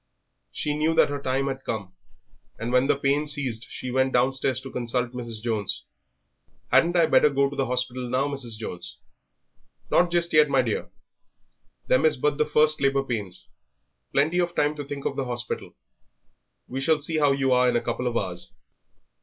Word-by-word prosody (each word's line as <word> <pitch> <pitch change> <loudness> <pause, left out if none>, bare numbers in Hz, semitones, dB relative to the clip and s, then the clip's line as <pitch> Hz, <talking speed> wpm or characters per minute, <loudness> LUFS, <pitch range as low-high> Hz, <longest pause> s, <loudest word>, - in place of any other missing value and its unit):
She 150 - -2
knew 155 +2 +1
that 145 - +4
her 145 -1 -3
time 135 0 0
had 135 -1 -4
come, 100 -4 -4 0.6
and 115 +2 -4
when 125 +1 +4
the - - +3
pain 140 +2 +1
ceased 130 -6 -3
she 125 - -6
went 130 +1 +1
downstairs 130 +1 +1
to 135 0 -9
consult 120 0 -2
Mrs. 115 -3 -6
Jones. 110 -4 -2 0.9
"Hadn't 175 +1 +4
I 170 -2 +5
better 150 - +5
go 140 0 +2
to - - -6
the 135 -1 0
hospital 125 0 -2
now, 130 +3 +1
Mrs. 130 -6 -6
Jones?" 105 -5 -7 0.9
"Not 175 0 +4
just 170 0 0
yet, 150 -1 +6
my 135 -2 +3
dear; 115 -3 -2 1.0
them 130 - +3
is 155 -2 +3
but 150 +2 0
the 150 - +2
first 155 0 +3
labour 135 0 +2
pains; 105 -8 -5 0.6
plenty 155 +6 +2
of 175 -1 0
time 150 +1 +2
to 145 - -4
think 140 0 -7
of - - -1
the 135 - -2
hospital; 120 -1 -5 0.9
we 130 +2 -4
shall 155 +2 +3
see 155 +2 -2
how 145 -2 +4
you 135 -1 +1
are 125 0 +4
in 120 - 0
a - - +4
couple 125 - -2
of 120 -1 0
hours." 90 -3 -4
135 Hz, 185 wpm, -25 LUFS, 125-145 Hz, 1.0 s, yet